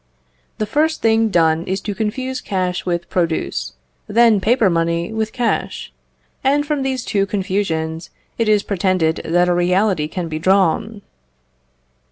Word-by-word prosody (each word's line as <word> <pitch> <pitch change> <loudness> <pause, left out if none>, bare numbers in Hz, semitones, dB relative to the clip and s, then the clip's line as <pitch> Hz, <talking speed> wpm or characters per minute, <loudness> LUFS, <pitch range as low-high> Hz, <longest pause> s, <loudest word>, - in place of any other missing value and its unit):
The 215 - -1
first 310 +8 0
thing 225 0 +3
done 165 -4 +2
is 190 +1 -1
to 210 - -4
confuse 255 +6 -3
cash 185 -2 -2
with 170 -1 -1
produce, 170 -3 -2 0.3
then 225 -1 +4
paper 230 +1 +3
money 170 +2 0
with 220 0 -2
cash; 240 -2 -2 0.5
and 285 +2 +2
from 295 -2 -1
these 265 -2 -2
two 200 -1 0
confusions 180 -5 -2 0.3
it 225 -2 +2
is 210 -1 +3
pretended 185 -4 0
that 175 +2 +2
a 180 - +2
reality 180 -1 +1
can 175 +2 -4
be 155 -1 -4
drawn. 195 +4 +1
195 Hz, 145 wpm, -19 LUFS, 175-220 Hz, 0.5 s, then